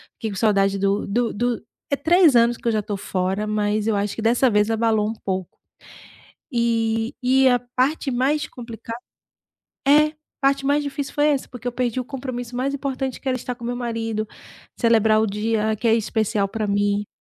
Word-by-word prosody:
fiquei 220 - -4
com 195 - -6
saudade 195 -2 +2
do 200 +1 0
do 230 +3 0
do 240 +1 -1 0.3
é - - +4
3 330 -1 +5
anos 235 0 +5
que - - -6
eu 230 - +4
já 215 - +1
tô 205 0 -3
fora, 190 +1 -2
mas 210 0 0
eu 220 - +2
acho 200 0 -1
que 225 - -5
dessa 240 +3 +4
vez 210 0 +2
abalou 220 -2 +2
um - - -2
pouco 185 -2 -3 0.9
e 230 0 0
e 260 +1 +5
a 245 0 +3 0.2
parte 270 +2 +1
mais 280 +5 +1
complicada 230 -1 -8 0.9
É, 300 +2 +5 0.3
parte 275 0 +2
mais 290 +1 +2
difícil 280 0 -4
foi 295 0 +3
essa, 280 -3 0
porque 245 -1 -10
eu - - -3
perdi 245 0 -1
o - - -4
compromisso 250 -2 -6
mais 275 +2 -1
importante 270 -1 -3
que 270 - -4
era 255 - +1
estar 250 +1 -4
com 240 - -10
o - - -3
meu 245 0 -2
marido, 225 -3 -3 0.5
celebrar 220 -2 +4
o - - +2
dia 215 +1 0
que 230 +3 0
é 225 - +5
especial 220 -2 0
pra 215 +1 -3
mim. 205 0 0
230 Hz, 200 wpm, -22 LUFS, 215-255 Hz, 0.9 s, 3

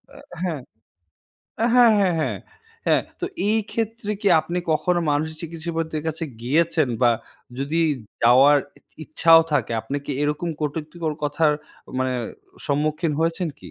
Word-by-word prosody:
আ - - -12 0.3
হ্যাঁ। 160 -7 -2 1.0
আ - - +4
হ্যাঁ, 240 -3 +7
হ্যাঁ, 185 -3 +2
হ্যাঁ, 155 - -1 0.5
হ্যাঁ, - - +4 0.2
তো 360 - -1 0.2
এই 220 - +3
ক্ষেত্রে 225 -1 -2
কি 200 - +4
আপনি 175 +3 -3
কখনো 175 +3 +1
মানসিক 155 +2 0
চিকিৎসাবিদদের 165 -1 -4
কাছে 160 +1 -3 0.2
গিয়েছেন? 155 +2 +2
বা 120 - +6 0.5
যদি 150 +5 0 0.4
যাওয়ার 135 +5 +6
ই - - -17 0.4
ইচ্ছাও 165 +2 +6
থাকে 145 -5 +1
আপনি 135 +6 -4
কি 145 - -2
এরকম 150 +4 -1
কটুক্তিকর 155 +2 -3
কথার 150 +1 +2 0.5
মানে 130 0 0 0.5
সম্মুখীন 150 +2 0
হয়েছেন 165 +1 0
কি? 90 - -11
160 Hz, 140 wpm, -23 LUFS, 145-170 Hz, 1.0 s, হ্যাঁ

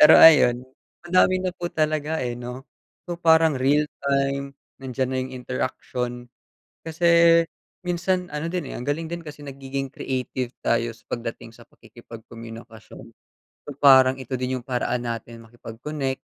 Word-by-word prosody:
Pero 150 +1 +9
ayun, 125 -6 +7 0.4
madami 185 +1 +3
na 185 - 0
po 175 - -3
talaga, 155 -1 -1
eh, 120 -1 -2
'no. 125 +2 -7 0.4
So 175 -1 -5
parang 160 -4 +4
real 140 +3 +3 0.2
time, 140 0 0 0.2
nandiyan 130 -1 -3
na 130 - -2
'yung 130 0 -4
interaction. 125 -1 -4 0.6
Kasi 160 +2 -4 0.8
minsan 180 0 -1
ano 150 +2 -3
din, 170 -5 -4
eh, - - -7
ang 125 - -7
galing 160 +3 -2
din 170 - -4
kasi 150 0 -9
nagiging 135 -1 -5
creative 130 -2 -4
tayo 115 0 +1
sa 115 - -22
pagdating 115 -1 -5
sa 120 0 -17
pakikipagkomunikasyon. 115 -1 -12 0.6
So - - -9
parang 130 -1 +6
ito 130 +1 -4
din 130 +1 -2
'yung 120 - -18
paraan 125 -1 -1
natin 115 0 -6
makipag-connect, 130 +4 -5
130 Hz, 145 wpm, -24 LUFS, 120-150 Hz, 0.8 s, Pero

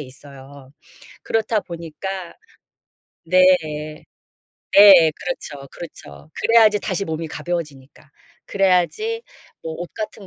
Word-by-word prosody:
있어요. 135 0 -12 0.5
그렇다 220 -1 0
보니까 170 +1 -7 0.9
네. 185 +2 +4 1.3
네 190 -6 +8
그렇죠, 145 - -7
그렇죠. 75 - -12
그래야지 220 -3 +4
다시 195 -1 -3
몸이 160 -1 -5
가벼워지니까. 155 -4 -7 0.4
그래야지 195 - 0 0.4
뭐 160 -1 -6
옷 175 - -8
같은 210 -2 -7
170 Hz, 230 characters per minute, -20 LUFS, 145-200 Hz, 1.3 s, 네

